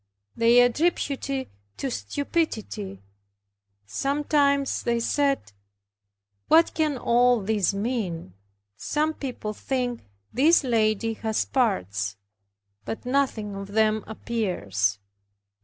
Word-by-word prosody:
They 235 +1 +6
attributed 280 +2 +1
it 270 -1 -2 0.3
to 270 - -3
stupidity. 220 - -3 0.8
Sometimes 280 - +1
they 235 0 0
said, 275 - 0 1.0
"What 330 +1 +5
can 305 -4 0
all 245 0 +3
this 205 -1 +1
mean? 195 - -3 0.4
Some 305 +1 -1
people 250 -7 -5
think 245 +1 -2 0.3
this 305 +7 +5
lady 225 -2 +1
has 220 -1 0
parts, 100 - 0 0.7
but 225 - -6
nothing 250 -6 0
of 195 0 -7
them 220 0 +2
appears." 105 - -1
235 Hz, 95 wpm, -25 LUFS, 205-275 Hz, 1.0 s, They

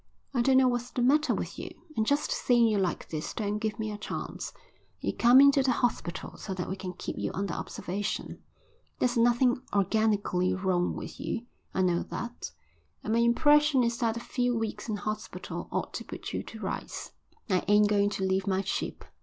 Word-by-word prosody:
I 245 - +2
don't 260 +2 +4
know 260 -1 +6
what's 245 0 -1
the 245 - -1
matter 295 +5 +4
with - - -5
you, - - -5 0.3
and 220 0 +1
just 285 +1 +1
seeing 240 -2 +3
you 215 -3 +2
like 185 -3 -1
this 155 -1 -4
don't 210 -1 -1
give 215 +1 -2
me 220 -1 -3
a 210 - -6
chance. - - -5 0.5
You - - -2
come 245 +2 +7
into 280 0 +7
the 260 -1 +2
hospital 230 -8 -2
so 190 - -5
that 180 - -3
we 190 - -3
can 185 -1 -6
keep - - -6
you - - -1
under 195 -3 -2
observation. 200 +3 -4 0.6
There's 250 0 +1
nothing 240 +2 +3
organically 200 -2 +2
wrong 185 -2 0
with - - -7
you, 240 0 -3 0.3
I 190 - +2
know 175 -1 +2
that, 235 +8 -5 0.5
and 215 - -1
my 230 - +3
impression 295 +3 +5
is 235 0 0
that 230 -1 +1
a - - -2
few 245 0 0
weeks 225 +1 -3
in 215 - 0
hospital 215 +1 -5
ought - - -2
to - - -4
put - - -7
you - - -1
to - - -9
rights." - - -5 0.4
"I 185 -4 +1
ain't 210 +1 +5
going 205 -1 +3
to 200 -2 -3
leave 190 0 +1
my 190 0 +1
ship." 200 - -3
220 Hz, 200 wpm, -29 LUFS, 195-245 Hz, 0.6 s, come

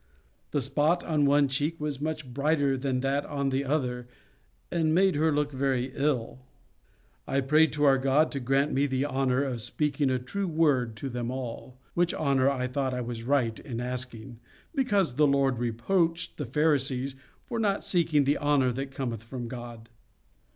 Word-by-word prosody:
The 145 - 0
spot 150 +6 +1
on 150 -3 +1
one 145 0 +4
cheek 145 +5 -1
was 150 -2 -3
much 155 -4 -4
brighter 140 0 +1
than 130 -1 -1
that 135 +2 0
on 140 -2 -1
the 135 +1 0
other, 125 -4 -1 0.6
and 160 -2 +1
made 190 +1 +4
her 155 +2 +2
look 150 0 0
very 130 -1 -1
ill. 130 -4 -1 0.9
I 135 - +1
prayed 155 +4 +4
to 150 0 -1
our 135 -2 +5
God 135 +4 +3
to 140 - -3
grant 135 +3 +1
me 140 +2 +2
the 135 0 0
honour 135 -1 +1
of 125 -4 -3
speaking 150 +3 0
a 130 - +1
true 190 +11 -3
word 145 -8 +1
to 135 +5 -5
them 120 -1 -3
all; 125 0 -6 0.2
which 175 0 +1
honour 140 -3 +2
I 130 -2 -1
thought 130 0 -1
I 125 - -2
was 120 -1 -5
right 120 -3 0
in 120 -5 -6
asking, 125 -2 -5 0.3
because 200 - +1
the 150 -1 +5
Lord 135 -3 +2
reproached 165 - 0
the 145 - -4
Pharisees 135 -1 +1 0.3
for 235 -2 -3
not 205 -3 0
seeking 160 -5 +2
the 140 +2 +1
honour 145 -3 +2
that 135 +3 -4
cometh 125 -5 -4
from 120 +1 -6
God. 120 -2 -8
135 Hz, 180 wpm, -28 LUFS, 125-150 Hz, 0.9 s, our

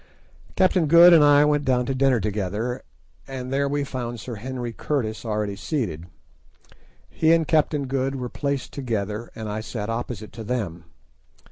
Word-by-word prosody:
Captain 185 -3 +3
Good 170 +3 +8
and 160 -3 +7
I 145 0 +6
went 150 -1 +2
down 125 -2 +1
to 135 - -1
dinner 130 -2 +2
together, 105 +4 -2 0.5
and 130 -1 -5
there 140 0 +1
we 145 0 0
found 120 -3 -5
Sir 120 +3 -7
Henry 120 +1 -5
Curtis 115 -5 -2
already 105 -2 -2
seated. 95 - -3 1.0
He 160 0 +1
and 165 -2 +2
Captain 150 -2 +2
Good 135 +1 -1
were 125 -2 -4
placed 140 +1 -3
together, 110 -4 -3
and 110 -1 -6
I 105 +1 -3
sat 110 -1 -5
opposite 115 -2 -5
to 115 - -7
them. 100 -8 -3
125 Hz, 160 wpm, -24 LUFS, 110-140 Hz, 1.0 s, Good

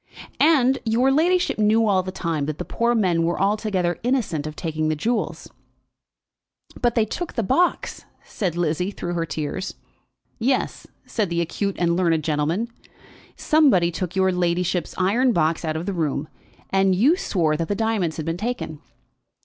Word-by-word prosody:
"And 270 -4 +4
your 240 +4 +2
ladyship 345 +1 +2
knew 215 +2 +4
all 190 -2 +3
the 185 0 -6
time 165 -6 -2
that 155 -1 -3
the 180 - -5
poor 235 +1 0
men 180 -7 +2
were 170 +1 0
altogether 195 -3 0
innocent 230 - -1
of 155 - -7
taking 155 -2 -2
the 155 - +1
jewels?" 230 +10 -2 1.3
"But 240 -1 +2
they 225 -3 +3
took 345 - -5
the 230 - -1
box," 345 - 0 0.2
said 180 -5 -3
Lizzie, 175 +2 0
through 175 -3 -5
her 165 -1 -2
tears. 155 +6 -4 0.6
"Yes," 255 +3 -1 0.2
said 215 -6 -1
the 170 0 -1
acute 195 +4 -2
and 170 -1 +1
learned 165 -3 +1
gentleman, 160 +9 0 0.7
"somebody 265 - +3
took 180 +1 -4
your 190 0 +3
ladyship's 180 0 -1
iron 230 +7 +2
box 165 -2 +1
out 155 -1 -2
of 165 - -4
the 200 - -2
room, 155 -3 -1 0.4
and 195 -1 +3
you 265 - +4
swore 170 - 0
that 165 +1 -2
the 205 - -1
diamonds 215 -7 0
had 155 - -4
been 165 +1 -2
taken. 215 -8 -4
185 Hz, 165 wpm, -23 LUFS, 165-225 Hz, 1.3 s, And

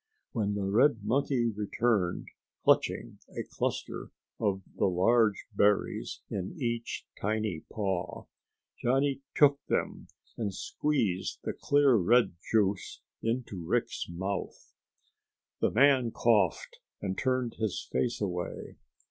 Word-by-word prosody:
When 105 -3 -1
the 100 -1 -1
red 115 +3 +3
monkey 125 +2 +1
returned, 105 -2 0 0.3
clutching - - +2 0.2
a - - -1
cluster - - -3 0.3
of 100 -3 0
the - - +2
large 105 +4 +3
berries 100 0 +1
in 95 -1 -4
each 115 -2 -2 0.2
tiny 105 -5 -1
paw, 95 -4 -2 0.6
Johnny 135 +2 +1
took 145 -1 +5
them - - -1 0.3
and 105 -5 -2
squeezed 110 -12 -1
the - - -2
clear 145 -2 +3
red 115 +5 +4 0.2
juice 100 -3 +1 0.2
into 115 -6 -2
Rick's - - -1
mouth. 95 +3 -5 0.9
The - - +3
man 130 -1 +4
coughed 120 - +1 0.2
and 95 -1 -3
turned 130 -1 -1
his 110 -4 -2
face 120 - 0
away. 90 -4 -4
110 Hz, 115 wpm, -30 LUFS, 95-125 Hz, 0.9 s, took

